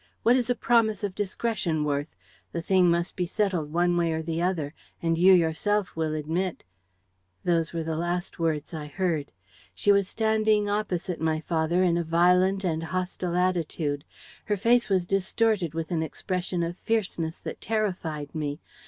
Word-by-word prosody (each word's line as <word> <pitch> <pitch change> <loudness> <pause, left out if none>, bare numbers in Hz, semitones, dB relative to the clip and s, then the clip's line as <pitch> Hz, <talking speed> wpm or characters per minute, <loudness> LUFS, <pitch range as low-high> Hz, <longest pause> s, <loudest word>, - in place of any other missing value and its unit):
What 240 +2 +5
is 250 -2 0
a 245 - +3
promise 230 -4 +2
of 200 -2 -2
discretion 190 -5 -1
worth? 145 0 -2 0.4
The 170 - -2
thing 185 0 +4
must 170 +1 0
be 180 -2 -1
settled 180 -6 -1
one 175 +1 +2
way 170 -1 +1
or 160 0 -2
the 165 +1 -2
other; 165 -5 -1 0.3
and 165 -1 +1
you 180 +3 +6
yourself 180 +4 +2
will 160 -1 -1
admit... 165 +4 -2 0.4
.' 90 -1 -46
Those 165 -2 +1
were 165 -1 -3
the 160 0 -2
last 175 +2 -2
words 160 -1 -1
I 155 -2 -5
heard. 155 -2 -1 0.4
She 205 - +3
was 200 -1 +3
standing 220 -1 +2
opposite 190 -4 -2
my 160 -1 +1
father 165 +2 +1
in 175 -2 +2
a - - 0
violent 180 +4 +3
and 165 -3 0
hostile 180 +1 -3
attitude. 165 -5 0 0.4
Her 210 - 0
face 235 +4 +3
was 185 -3 +2
distorted 195 -2 +1
with 165 0 -3
an 165 -2 +1
expression 180 +2 -2
of 170 +1 -4
fierceness 180 -7 -1
that - - -7
terrified 180 -9 -2
me. 150 -1 -3
175 Hz, 170 wpm, -27 LUFS, 160-195 Hz, 0.4 s, you